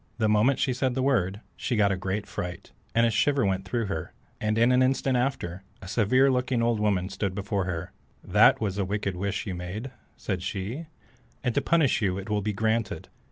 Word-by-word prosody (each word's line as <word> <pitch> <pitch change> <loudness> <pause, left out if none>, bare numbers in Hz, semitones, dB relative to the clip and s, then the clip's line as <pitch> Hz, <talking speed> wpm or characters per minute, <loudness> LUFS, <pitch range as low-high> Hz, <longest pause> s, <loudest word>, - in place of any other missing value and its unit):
The 110 -2 +2
moment 110 +6 +3
she 130 - +1
said 125 0 0
the 130 - 0
word, 105 -7 +1
she 125 - -2
got 105 -2 +3
a - - +1
great 95 +2 -3
fright, 90 -2 -6 0.2
and 115 0 +5
a 115 - +2
shiver 135 +3 +2
went 95 -1 0
through 115 +4 -1
her, 95 -6 -4 0.3
and 110 0 0
in 115 +2 +4
an 125 0 +4
instant 130 0 +2
after, 120 -9 -1 0.2
a 95 - -10
severe 125 +7 +3
looking 125 -2 +1
old 115 -2 +1
woman 100 -4 +1
stood 100 -1 -3
before 100 -1 -1
her. 85 -2 -4 0.3
"That - - +5
was 100 -2 -2
a - - +2
wicked 100 0 -2
wish 100 +2 -2
you 95 - -3
made," 95 +9 -5 0.3
said 95 -3 -3
she, 105 - -4 0.6
"and 125 -3 0
to - - +2
punish 155 -8 +2
you 95 -3 +1
it 100 +2 -6
will 105 -1 +1
be 105 +1 -1
granted. 110 +2 -1
105 Hz, 210 wpm, -27 LUFS, 95-125 Hz, 0.6 s, and